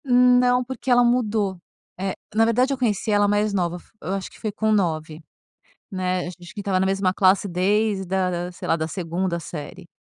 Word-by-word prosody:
Não. 250 -1 +4
Porque, 260 +1 -6
ela 245 0 +6
mudou. 215 -6 +1 0.4
É 190 0 -2 0.2
na 225 +1 +4
verdade, 250 +4 +2
eu - - -3
conheci 220 -3 0
ela 205 0 +4
mais 205 0 +1
nova. 175 -2 0
F - - -18
eu 190 - -3
acho 195 -1 -4
que - - -17
foi 215 - -3
com 220 +1 0
9, 160 -5 -1 0.7
né. 185 -1 -1
A - - -4
ge 180 - -9
a - - -14
gente 175 - -13
estava 195 -2 0
na 190 - +2
mesma 190 -1 +1
classe 190 +1 +3
desde 195 +2 +1
da 185 0 0
da, 175 0 -3
sei 175 - -8
lá, - - +3
da 160 -1 -2
2ª 170 +1 -2
série, 170 +2 -8
195 Hz, 215 wpm, -23 LUFS, 180-220 Hz, 0.7 s, ela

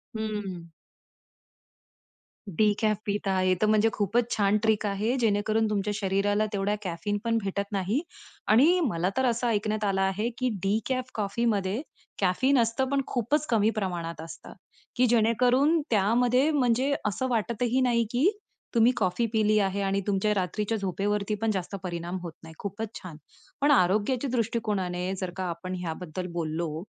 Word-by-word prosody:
हं. 210 -5 -4 1.9
डिकॅफ 210 +3 +2
पिता 200 -1 -1
आहे 185 0 +2
तर - - +4
म्हणजे 215 +1 +4
खूपच 225 +4 0
छान 200 0 +3
ट्रिक 220 -1 +2
आहे, 210 +4 0
जेणेकरून 220 -1 +1
तुमच्या 210 0 -1
शरीराला 205 +1 +1
तेवढ्या 200 +1 0
कॅफीन 185 +3 -2
पण 230 0 +1
भेटत 200 +1 -3
नाही. 200 +7 0 0.5
आणि 290 +12 +5
मला 180 - 0
तर 260 - +2
असं 240 0 +1
ऐकण्यात 215 -1 0
आलं 195 -1 +1
आहे 195 +4 0
की 255 -1 0
डिकॅफ 250 +6 -1
कॉफी 210 +2 -1
मध्ये 205 +1 0 0.4
कॅफीन 255 +9 +3
असतं, 235 +3 +1
पण 280 0 +1
खूपच 275 +5 0
कमी 220 -2 +3
प्रमाणात 170 -6 -3
असतं. 165 - -10 0.4
की 255 - +4
जेणेकरून 245 +7 +3
त्यामध्ये 245 +6 +3
म्हणजे 260 -1 +2
असं 210 +5 -1
वाटतही 240 +2 0
नाही 235 -2 +2
की 265 +10 +3 0.5
तुम्ही 230 +1 +5
कॉफी 190 +3 +1
पिली 215 -1 +3
आहे. 200 0 0
आणि 195 0 0
तुमच्या 205 +1 +1
रात्रीच्या 210 +3 -1
झोपेवरती 200 +2 -1
पण 225 -1 +2
जास्त 190 -1 -3
परिणाम 175 0 -4
होत 170 -3 -6
नाही. 160 0 -11
खूपच 205 +2 -5
छान. 170 -5 -9 0.4
पण 290 +1 +4
आरोग्याच्या 230 +4 +2
दृष्टिकोनाने 205 -6 -1
जर 185 -1 -3
का 190 - -2
आपण 185 +2 -5
याबद्दल 180 +2 -5
बोललो, 160 -1 -3
210 Hz, 150 wpm, -27 LUFS, 190-235 Hz, 1.9 s, आणि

